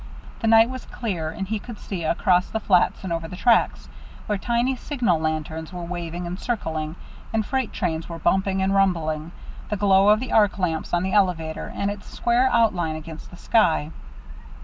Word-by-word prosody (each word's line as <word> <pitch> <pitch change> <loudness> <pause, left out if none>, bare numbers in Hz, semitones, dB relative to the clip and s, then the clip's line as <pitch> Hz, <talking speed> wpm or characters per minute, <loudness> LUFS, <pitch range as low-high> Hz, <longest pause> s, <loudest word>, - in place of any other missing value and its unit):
The 225 - -1
night 225 0 +7
was 255 -1 -7
clear, 180 -10 -3
and 195 +4 -5
he 215 +1 -2
could 235 0 -9
see, 185 -5 -5
across 180 +3 +2
the 220 - -2
flats 185 -3 +2
and 185 -3 -2
over 165 0 -3
the 180 - -8
tracks, 230 +4 +2 0.4
where 210 -2 -1
tiny 240 +4 0
signal 240 - 0
lanterns 155 0 -3
were 180 -1 -6
waving 175 0 -5
and 175 +2 -5
circling, 160 -9 -3 0.4
and 220 -1 0
freight 260 -2 -1
trains 165 -2 -2
were 170 - -5
bumping 190 +3 +1
and 190 +1 +1
rumbling, 165 -5 +1 0.4
the 210 - -1
glow 195 0 +4
of 210 0 +5
the 255 0 -5
arc 205 -2 +4
lamps 165 -4 -2
on 175 0 +1
the 190 - -2
elevator, 175 -6 0
and 200 0 -1
its 205 0 -9
square 245 +2 +2
outline 180 -9 +2
against 155 0 -9
the 180 - -12
sky. 170 -8 +2
190 Hz, 190 wpm, -24 LUFS, 165-215 Hz, 0.4 s, night